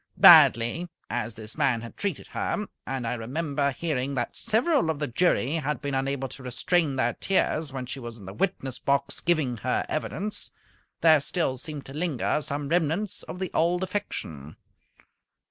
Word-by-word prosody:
Badly 120 +10 +7 0.2
as 115 - -2
this 110 0 -7
man 135 -6 +2
had 115 - -9
treated 200 -7 -3
her 210 - -2 0.2
and 135 -2 -3
I 115 - -1
remember 140 +4 -1
hearing 140 -2 -2
that 130 - -2
several 235 - +2
of 160 - 0
the 145 - -1
jury 145 +1 +1
had 150 -1 -2
been 140 -1 -4
unable 135 0 -1
to 135 - -10
restrain 140 +4 0
their 120 -2 +1
tears 160 -5 0
when 130 -1 -4
she 135 +2 -6
was 120 -2 -7
in 100 - -12
the 95 - -7
witness 135 - -2
box 140 0 0
giving 155 -8 +1
her - - -1
evidence 200 +9 -3 0.5
there 160 -2 +7
still 145 -1 -1
seemed 145 +2 -7
to 135 - -10
linger 150 -2 0
some 145 0 -3
remnants 175 +4 +1
of - - -7
the 185 -1 -3
old 175 +2 +2
affection. 85 - -4
140 Hz, 170 wpm, -27 LUFS, 125-170 Hz, 0.5 s, Badly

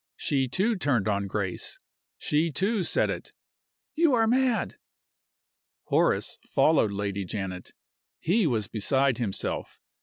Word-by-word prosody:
She, 135 -2 0
too, 200 - +1
turned 130 - +1
on 100 -1 0
Grace. 95 -2 -3 0.4
She, 155 +2 +1
too, 195 +5 0
said - - +1
it: - - -7 0.6
"You 320 -4 +3
are 225 -1 +3
mad!" 250 +1 +1 1.1
Horace - - +1
followed 155 -9 +3
Lady 100 -1 -2
Janet. 95 -1 -5 0.5
He 190 +3 +2
was 110 -6 0
beside 130 +3 +1
himself. 105 -6 -3
135 Hz, 120 wpm, -27 LUFS, -, 1.1 s, You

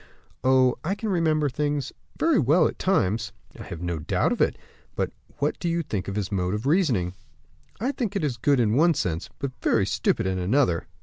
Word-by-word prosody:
"Oh! 130 -1 +4
I 190 +5 -1
can 220 +1 -4
remember 160 -5 +2
things 145 0 -2 0.2
very 325 -6 +3
well, 155 +5 +4
at - - -7
times!" 115 - +1 0.3
"I - - -7
have 85 0 -7
no 85 -2 -2
doubt 75 - 0
of - - -1
it; - - +2 0.4
but - - -1 0.3
what 145 +1 -1
do 175 - -1
you 170 0 0
think 105 -9 -4
of 100 - -4
his 105 -1 -2
mode 90 0 0
of 105 +4 -5
reasoning?" 135 - +2 0.7
"I 250 +6 0
think 225 -7 -3
it 145 - -1
good 140 0 +3
in 110 -3 +2
one 165 +5 +4
sense, 85 -7 -2
but 140 -1 -3
very 105 -4 +2
stupid - - 0
in 95 -1 -1
another." 90 -2 +1
135 Hz, 200 wpm, -25 LUFS, 100-165 Hz, 0.7 s, Oh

